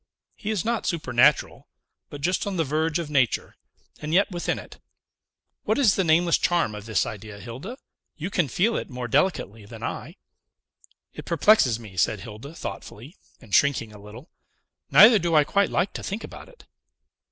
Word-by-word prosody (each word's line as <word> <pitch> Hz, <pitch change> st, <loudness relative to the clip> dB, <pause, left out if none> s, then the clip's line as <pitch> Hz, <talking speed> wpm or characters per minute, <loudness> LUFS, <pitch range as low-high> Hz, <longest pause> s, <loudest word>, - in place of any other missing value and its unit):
He 215 Hz, -, -6 dB
is 215 Hz, -4 st, -1 dB
not 235 Hz, 0 st, -1 dB
supernatural, 145 Hz, -4 st, +1 dB, 0.4 s
but 145 Hz, -, -9 dB
just 180 Hz, +6 st, 0 dB
on 195 Hz, -2 st, -3 dB
the 165 Hz, -, +2 dB
verge 155 Hz, +3 st, 0 dB
of 165 Hz, -3 st, -5 dB
nature, 130 Hz, -5 st, 0 dB, 0.4 s
and 155 Hz, +2 st, -2 dB
yet 195 Hz, +2 st, +3 dB
within 175 Hz, -1 st, -2 dB
it. -, -, -11 dB, 0.8 s
What -, -, 0 dB
is 245 Hz, -9 st, +4 dB
the 190 Hz, -, +1 dB
nameless 170 Hz, +1 st, +3 dB
charm 170 Hz, -11 st, +1 dB
of 105 Hz, 0 st, -9 dB
this 110 Hz, -4 st, +1 dB
idea, 105 Hz, -2 st, -8 dB
Hilda? 135 Hz, -, -8 dB, 0.4 s
You 170 Hz, +5 st, -5 dB
can 180 Hz, -6 st, +1 dB
feel 205 Hz, -, +1 dB
it -, -, -5 dB
more 125 Hz, -2 st, -5 dB
delicately 115 Hz, -, 0 dB
than 100 Hz, -, -11 dB
I." -, -, -5 dB, 1.0 s
"It -, -, -9 dB
perplexes 170 Hz, -, +3 dB
me," 105 Hz, -5 st, -12 dB
said 80 Hz, -, +1 dB
Hilda 120 Hz, +9 st, -10 dB
thoughtfully, 115 Hz, -, -8 dB, 0.2 s
and 110 Hz, -6 st, -15 dB
shrinking 120 Hz, -6 st, +2 dB
a 105 Hz, -, -13 dB
little; 110 Hz, -, -13 dB, 0.6 s
"neither 220 Hz, 0 st, +8 dB
do 170 Hz, -2 st, 0 dB
I 150 Hz, -, +6 dB
quite 200 Hz, +7 st, +1 dB
like 180 Hz, +3 st, 0 dB
to -, -, -6 dB
think 205 Hz, +3 st, -5 dB
about -, -, -10 dB
it." -, -, -19 dB
155 Hz, 175 wpm, -24 LUFS, 115-185 Hz, 1.0 s, neither